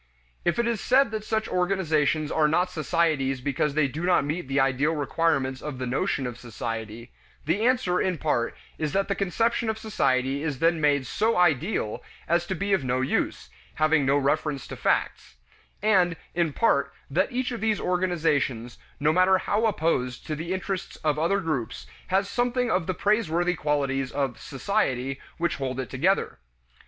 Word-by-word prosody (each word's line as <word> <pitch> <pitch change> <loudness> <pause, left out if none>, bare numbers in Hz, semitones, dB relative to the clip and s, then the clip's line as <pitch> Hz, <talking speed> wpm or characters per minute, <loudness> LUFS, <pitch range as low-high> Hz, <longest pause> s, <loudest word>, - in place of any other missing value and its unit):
If 175 - +1
it 235 - +2
is 230 -3 -1
said 260 -1 +3
that 215 -1 -3
such 220 0 -1
organizations 160 -5 +1
are 155 -1 +3
not 175 +4 +1
societies 155 -4 0
because 140 +2 -1
they 155 -2 +3
do 150 +6 -6
not 180 -5 +3
meet 155 +1 -3
the 135 +1 +1
ideal 135 +4 +2
requirements 140 -3 0
of 150 -3 -5
the 130 - -3
notion 130 +1 -1
of 125 -1 -5
society, 115 -1 -6 0.3
the 195 +10 +1
answer, 245 -9 +2
in 185 -2 0
part, 130 -7 -1 0.2
is 155 -2 -2
that 195 +1 0
the - - +2
conception 225 +4 0
of 220 - -1
society 135 -11 0
is 150 -3 -2
then 165 +2 +2
made 145 -3 +2
so 220 - 0
"ideal" 170 - +1 0.3
as 170 +1 +1
to 190 - -2
be 200 +3 -1
of 190 - +2
no 130 0 0
use, 130 - -1 0.2
having 155 -1 +3
no 135 +1 +3
reference 145 0 0
to - - -5
facts; - - -1 0.5
and 185 -5 +3 0.2
in 170 -2 +1
part, 140 -5 +2 0.2
that 185 +7 +1
each 250 +1 -1
of 235 - -5
these 220 -1 +1
organizations, 155 -10 0 0.2
no 150 +2 +3
matter 185 +2 +5
how 210 +4 +1
opposed 155 - -1
to 155 - -3
the 165 +3 -5
interests 190 0 -3
of 150 -1 +1
other 170 +5 +2
groups, 155 - -3 0.2
has 195 +2 +1
something 245 +1 0
of 180 -4 0
the 185 - -1
praiseworthy 180 -4 +1
qualities 140 -4 -1
of 135 -4 -2
"Society" 135 - -1 0.2
which 170 0 -1
hold 130 -2 -3
it 130 - -4
together. - - +1
160 Hz, 175 wpm, -26 LUFS, 135-190 Hz, 0.5 s, matter